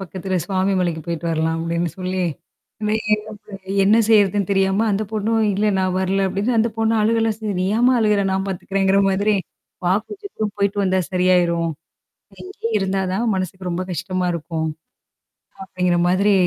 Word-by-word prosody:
பக்கத்துல 190 Hz, 0 st, -4 dB
சுவாமிமலைக்குப் 185 Hz, -4 st, 0 dB
போயிட்டு 170 Hz, 0 st, -4 dB
வரலாம்," 160 Hz, 0 st, 0 dB
அப்படின்னு 170 Hz, 0 st, -1 dB
சொல்லி. 185 Hz, 0 st, -2 dB, 0.7 s
வே 210 Hz, -, +1 dB, 0.2 s
ஏன்னா 215 Hz, 0 st, -7 dB, 0.5 s
"என்ன 215 Hz, +3 st, +5 dB
செய்றதுன்னு 205 Hz, -3 st, +3 dB
தெரியாம," 195 Hz, +2 st, +2 dB
அந்தப் 205 Hz, +1 st, -2 dB
பொண்ணும், 220 Hz, +1 st, 0 dB
"இல்ல, 205 Hz, +2 st, 0 dB
நான் 185 Hz, -1 st, 0 dB
வரல," 195 Hz, +1 st, +1 dB
அப்படின்னு 225 Hz, +2 st, +1 dB
அழுகலாமே 225 Hz, 0 st, +2 dB
செஞ்சா. 215 Hz, -3 st, -4 dB
"நீ 185 Hz, -, +1 dB
ஏம்மா 250 Hz, +2 st, +4 dB
அழுகுற? 210 Hz, -2 st, +2 dB
நான் 190 Hz, +1 st, -1 dB
பார்த்துக்கிறேன்"ங்கிற 195 Hz, +1 st, +1 dB
மாதிரி. 205 Hz, +2 st, +2 dB, 0.8 s
கொஞ்ச 415 Hz, 0 st, -9 dB
தூரம் 210 Hz, -2 st, -2 dB
"போயிட்டு 200 Hz, 0 st, 0 dB
வந்தா 190 Hz, 0 st, +2 dB
சரியாயிரும். 175 Hz, -2 st, +2 dB, 0.7 s
இங்கேயே 370 Hz, -12 st, -5 dB
இருந்தாத்தான் 190 Hz, +2 st, -1 dB
மனசுக்கு 185 Hz, 0 st, -4 dB
ரொம்ப 175 Hz, +1 st, -2 dB
கஷ்டமா 185 Hz, +2 st, -2 dB
இருக்கும்," 160 Hz, -1 st, -3 dB, 1.0 s
அப்படிங்கிற 180 Hz, -2 st, 0 dB
மாதிரி 200 Hz, +3 st, +3 dB
195 Hz, 140 wpm, -21 LUFS, 180-210 Hz, 1.0 s, என்ன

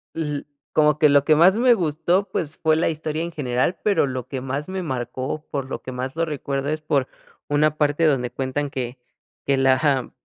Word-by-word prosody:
L 150 Hz, -3 st, -3 dB, 0.3 s
como 150 Hz, -1 st, +3 dB
que 155 Hz, -, +6 dB
lo 145 Hz, -1 st, +5 dB
que 155 Hz, +1 st, +4 dB
más 185 Hz, +5 st, +6 dB
me 245 Hz, +1 st, +5 dB
gustó, 175 Hz, +1 st, 0 dB
pues, 155 Hz, -4 st, -3 dB
fue 160 Hz, -1 st, +2 dB
la 160 Hz, -, +1 dB
historia 155 Hz, 0 st, -3 dB
en 170 Hz, -, -4 dB
general, 130 Hz, +3 st, -1 dB
pero 200 Hz, -9 st, +2 dB
lo 130 Hz, -2 st, -5 dB
que 130 Hz, -1 st, -5 dB
más 135 Hz, +3 st, -4 dB
me 190 Hz, 0 st, -4 dB
marcó, 130 Hz, +1 st, -4 dB
por 135 Hz, -2 st, -4 dB
lo -, -, -5 dB
que 130 Hz, -, -7 dB
más 130 Hz, +3 st, -4 dB
lo 165 Hz, -, +1 dB
recuerdo, 140 Hz, -2 st, -3 dB
es 155 Hz, 0 st, -2 dB
por 145 Hz, -4 st, 0 dB, 0.4 s
una 150 Hz, +1 st, +2 dB
parte 150 Hz, +2 st, +1 dB
donde 135 Hz, -5 st, +2 dB
cuentan 135 Hz, +2 st, -2 dB
que 125 Hz, -2 st, -5 dB, 0.5 s
que 140 Hz, -, +2 dB
la 130 Hz, 0 st, +4 dB
ja 135 Hz, -4 st, +1 dB
145 Hz, 210 wpm, -23 LUFS, 130-160 Hz, 0.5 s, que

